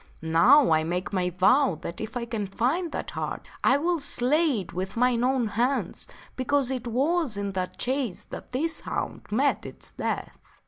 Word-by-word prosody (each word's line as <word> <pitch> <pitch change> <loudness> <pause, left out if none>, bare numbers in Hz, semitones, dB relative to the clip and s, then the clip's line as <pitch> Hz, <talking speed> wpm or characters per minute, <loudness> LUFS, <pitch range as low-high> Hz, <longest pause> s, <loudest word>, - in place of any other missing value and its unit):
Now, 165 - +5
I 155 0 +4
make 180 +5 -3
my 180 -2 +1
vow 190 - +3
that 170 - -5
if 220 +3 -4
I 235 - -3
can 220 -3 -3
find 275 - 0
that - - -4
hart - - -4 0.2
I 265 - +5
will 340 +3 0
slay 280 -1 +1
it 180 - -11
with 190 +4 -4
mine 245 0 +3
own 255 -3 +1
hands, 245 +6 -1 0.3
because 265 0 +1
it 255 -2 -3
was 275 +1 +1
in 200 0 -2
that 185 -1 -3
chase 245 -7 -2
that - - -8
this 320 +6 -1
hound - - -4
met 265 +7 +1
its - - -7
death." - - -4
245 Hz, 180 wpm, -26 LUFS, 195-280 Hz, 0.3 s, Now